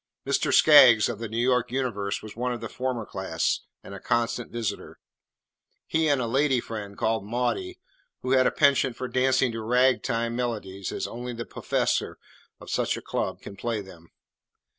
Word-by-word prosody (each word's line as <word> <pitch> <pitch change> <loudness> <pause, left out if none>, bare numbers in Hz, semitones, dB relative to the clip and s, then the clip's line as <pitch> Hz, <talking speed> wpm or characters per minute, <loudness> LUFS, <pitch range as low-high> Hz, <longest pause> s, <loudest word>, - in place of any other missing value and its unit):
Mr. - - +1
Skaggs, 130 -8 +7
of 115 -3 -5
the 115 - -4
New 115 - -5
York 125 0 +1
Universe, 105 -6 -2
was 110 - -9
one 125 +2 -2
of 120 - -4
the - - -5
former 125 -3 -3
class 95 -5 -1 0.2
and - - -10
a 100 - -7
constant 120 +1 -1
visitor, 110 -4 -4 0.9
he 160 0 +1
and 145 -3 +3
a 125 - -1
"lady 135 +2 +2
friend" 105 -4 -7
called 110 -2 0
"Maudie," 125 - -2 0.4
who 130 - -2
had 130 -1 +5
a - - +1
penchant 135 -3 +3
for 130 - -4
dancing 130 0 +2
to 115 0 -5
"Rag 125 +3 +3
time" 115 -1 -2
melodies 105 -6 -4
as - - -3
only 120 +1 -6
the 115 0 -6
"puffessor" - - -1 0.4
of - - -10
such - - 0
a - - -7
club - - -3
can - - -9
play 115 +2 -2
them. 85 -4 -12
120 Hz, 185 wpm, -26 LUFS, 110-130 Hz, 0.9 s, Skaggs